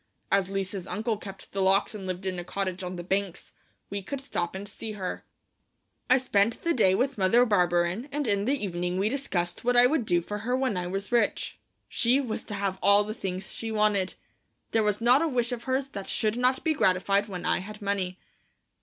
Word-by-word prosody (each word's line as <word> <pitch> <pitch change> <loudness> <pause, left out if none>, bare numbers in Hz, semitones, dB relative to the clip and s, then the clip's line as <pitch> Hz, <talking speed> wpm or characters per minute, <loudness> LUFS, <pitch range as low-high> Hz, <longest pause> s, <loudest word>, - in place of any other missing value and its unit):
As 195 -1 +3
Lise's 195 -1 -3
uncle 220 +2 -1
kept 195 -2 -9
the 195 - -2
locks 195 +3 +3
and 195 -3 -6
lived 185 +1 -4
in 185 -1 -2
a - - -4
cottage 185 +1 -3
on 180 0 -4
the 175 - -6
banks, 195 0 -2 0.4
we 200 0 -2
could 275 +8 -5
stop 190 -10 -3
and 200 +2 -5
see 215 +2 -6
her. 190 -3 -4 0.9
I 255 - +7
spent 225 -4 +2
that 335 - +1
day 190 -6 +4
with 265 +1 0
Mother 230 +6 +5
Barberin, 180 - +1
and 290 -2 -1
in 200 -1 +1
the 270 -1 0
evening 180 -1 -2
we 200 +3 +2
discussed 195 -10 -2
what 245 +1 +2
I 245 - +8
would 250 -4 +1
do 175 - +3
for 210 +4 -4
her 250 +4 0
when 260 -5 0
I 180 -1 -2
was 195 +4 -4
rich. 240 -1 +1 0.3
She 245 +3 +2
was 245 -6 -3
to 205 - -5
have 195 -1 -2
all 200 +1 +6
the 215 +1 -4
things 190 -3 -5
she 225 -1 -4
wanted. 210 -3 +1 0.6
There 225 - +3
was 210 0 0
not 245 +5 +5
a 330 - +2
wish 245 -4 0
of 235 -1 -5
hers 265 +1 0
that 200 -6 -7
should 215 0 0
not 250 +2 +1
be 320 - +2
gratified 195 -3 +2
when 180 -4 -6
I - - +2
had 210 +3 -8
money. 195 -3 -2
200 Hz, 215 wpm, -27 LUFS, 190-240 Hz, 0.9 s, I